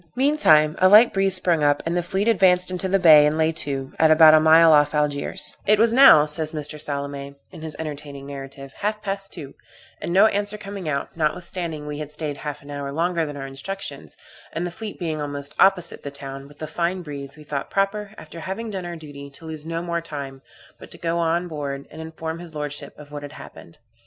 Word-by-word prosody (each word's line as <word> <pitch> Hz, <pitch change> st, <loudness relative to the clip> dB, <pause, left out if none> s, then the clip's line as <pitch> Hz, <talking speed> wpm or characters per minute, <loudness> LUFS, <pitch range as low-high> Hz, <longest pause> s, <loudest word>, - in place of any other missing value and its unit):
Meantime, 165 Hz, -, +4 dB
a 185 Hz, -, +5 dB
light 215 Hz, +4 st, +7 dB
breeze 195 Hz, -1 st, +1 dB
sprung 175 Hz, -3 st, +1 dB
up, 145 Hz, 0 st, +2 dB
and 165 Hz, +1 st, -1 dB
the 175 Hz, -, +1 dB
fleet 190 Hz, +4 st, -2 dB
advanced 185 Hz, -4 st, +5 dB
into 185 Hz, +1 st, -2 dB
the 195 Hz, -, +3 dB
bay, 160 Hz, -5 st, +7 dB
and 150 Hz, +1 st, -1 dB
lay 160 Hz, 0 st, +2 dB
to, 135 Hz, -4 st, -4 dB
at 160 Hz, -, +5 dB
about 155 Hz, 0 st, +8 dB
a 155 Hz, -, +7 dB
mile 160 Hz, +1 st, +6 dB
off 145 Hz, 0 st, +3 dB
Algiers 150 Hz, 0 st, -1 dB
"It 210 Hz, +1 st, +5 dB
was 230 Hz, +2 st, +3 dB
now," 250 Hz, -, +8 dB
says 155 Hz, +1 st, +1 dB
Mr. 150 Hz, 0 st, -4 dB
Salame, 140 Hz, -1 st, -5 dB, 0.2 s
in -, -, -11 dB
his 155 Hz, -1 st, -5 dB
entertaining 145 Hz, -3 st, -7 dB
narrative, 135 Hz, -1 st, -9 dB
"half 210 Hz, +1 st, -2 dB
past 195 Hz, 0 st, -4 dB
two, 145 Hz, -6 st, -9 dB, 0.5 s
and -, -, -4 dB
no 190 Hz, +4 st, +6 dB
answer 205 Hz, 0 st, 0 dB
coming 200 Hz, -5 st, -6 dB
out, 140 Hz, -1 st, -3 dB
notwithstanding 165 Hz, -1 st, -3 dB
we 150 Hz, 0 st, -6 dB
had 150 Hz, -1 st, -6 dB
staid 150 Hz, -1 st, -4 dB
half 150 Hz, -1 st, -7 dB
an 145 Hz, -, -11 dB
hour 140 Hz, -1 st, -5 dB
longer 165 Hz, +1 st, -1 dB
than 145 Hz, -1 st, -7 dB
our 135 Hz, -, -6 dB
instructions, 170 Hz, +9 st, -7 dB, 0.3 s
and 170 Hz, -, -3 dB
the 175 Hz, -, -4 dB
fleet 215 Hz, +3 st, -8 dB
being 160 Hz, -4 st, -3 dB
almost 145 Hz, 0 st, -6 dB
opposite 185 Hz, -3 st, +3 dB
the 145 Hz, -, -6 dB
town, 135 Hz, -1 st, -8 dB
with 145 Hz, +1 st, -18 dB
a -, -, -1 dB
fine 175 Hz, +3 st, -2 dB
breeze, 140 Hz, -2 st, -8 dB
we 155 Hz, -, -13 dB
thought 145 Hz, -2 st, -5 dB
proper, 200 Hz, +1 st, -2 dB
after 170 Hz, -, -10 dB
having 210 Hz, +6 st, -5 dB
done 190 Hz, -3 st, -5 dB
our 175 Hz, -, -6 dB
duty, 145 Hz, -3 st, -10 dB
to 140 Hz, +4 st, -16 dB
lose 160 Hz, -1 st, -7 dB
no 165 Hz, +1 st, -3 dB
more 170 Hz, -1 st, -2 dB
time, 140 Hz, -4 st, -8 dB, 0.4 s
but -, -, -12 dB
to -, -, -10 dB
go 170 Hz, 0 st, -2 dB
on 170 Hz, +1 st, 0 dB
board, 140 Hz, -4 st, -5 dB
and 160 Hz, -, -9 dB
inform 160 Hz, 0 st, -6 dB
his 170 Hz, -2 st, -11 dB
lordship 150 Hz, -1 st, -6 dB
of 145 Hz, -1 st, -13 dB
what 145 Hz, 0 st, -6 dB
had 145 Hz, -1 st, -9 dB
happened. 85 Hz, -, -13 dB
160 Hz, 220 wpm, -22 LUFS, 145-180 Hz, 0.5 s, about